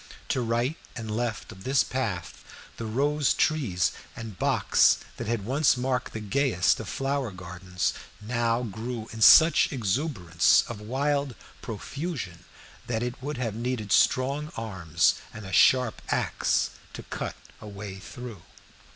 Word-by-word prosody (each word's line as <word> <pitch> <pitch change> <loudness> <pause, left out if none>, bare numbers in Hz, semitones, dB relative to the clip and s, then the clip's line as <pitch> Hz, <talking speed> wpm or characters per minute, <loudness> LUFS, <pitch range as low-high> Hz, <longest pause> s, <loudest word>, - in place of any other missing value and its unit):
To 130 - +1
right 120 +6 0 0.2
and 110 -2 -4
left 115 -1 -3
of 95 - -12
this 135 +1 +3
path, - - -4 0.3
the 115 - -4
rose 140 +1 +1
trees 110 - +1 0.2
and 115 -4 -7
box - - +4 0.2
that - - -5
had 115 -3 -1
once 135 +3 +3
marked 125 0 -1
the 110 - -4
gayest 110 -4 +2
of - - -6
flower 135 -2 -1
gardens 90 -1 -3 0.3
now 115 +2 0
grew 115 +1 -5
in 115 - -7
such 160 +8 +8
exuberance 110 - +2
of 105 - -7
wild 140 +3 -1 0.3
profusion 115 - -5 0.4
that 115 -1 -1
it 125 +1 -4
would 145 +1 -4
have 120 -4 -2
needed 115 -2 -3
strong 140 +4 +2
arms 90 -7 +1
and 110 -1 -9
a 95 - -7
sharp 125 +4 +4
axe - - +1 0.2
to - - -8
cut - - -5 0.3
a - - -9
way 100 -1 -7
through. 115 -1 -9
115 Hz, 140 wpm, -27 LUFS, 105-130 Hz, 0.4 s, such